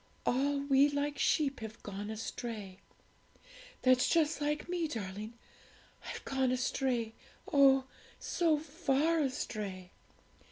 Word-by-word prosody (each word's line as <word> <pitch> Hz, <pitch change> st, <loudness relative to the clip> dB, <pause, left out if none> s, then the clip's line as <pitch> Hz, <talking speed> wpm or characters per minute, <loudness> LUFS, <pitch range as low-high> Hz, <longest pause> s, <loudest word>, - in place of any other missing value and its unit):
"All 280 Hz, +3 st, +1 dB
we 280 Hz, 0 st, +4 dB
like 285 Hz, 0 st, -2 dB
sheep 280 Hz, -3 st, +2 dB
have 220 Hz, 0 st, -8 dB
gone 205 Hz, +1 st, -5 dB
astray;" 215 Hz, -3 st, -5 dB, 1.0 s
that's 255 Hz, -1 st, +4 dB
just 315 Hz, -3 st, +2 dB
like 295 Hz, +1 st, -1 dB
me, 345 Hz, -2 st, -1 dB
darling 215 Hz, -3 st, -5 dB, 0.7 s
I've -, -, -6 dB
gone 265 Hz, -1 st, +1 dB
astray, 250 Hz, -3 st, 0 dB, 0.4 s
oh, 270 Hz, -2 st, +6 dB, 0.3 s
so 330 Hz, -3 st, +1 dB
far 315 Hz, +1 st, +1 dB
astray! 205 Hz, -9 st, -3 dB
265 Hz, 110 wpm, -33 LUFS, 220-290 Hz, 1.0 s, oh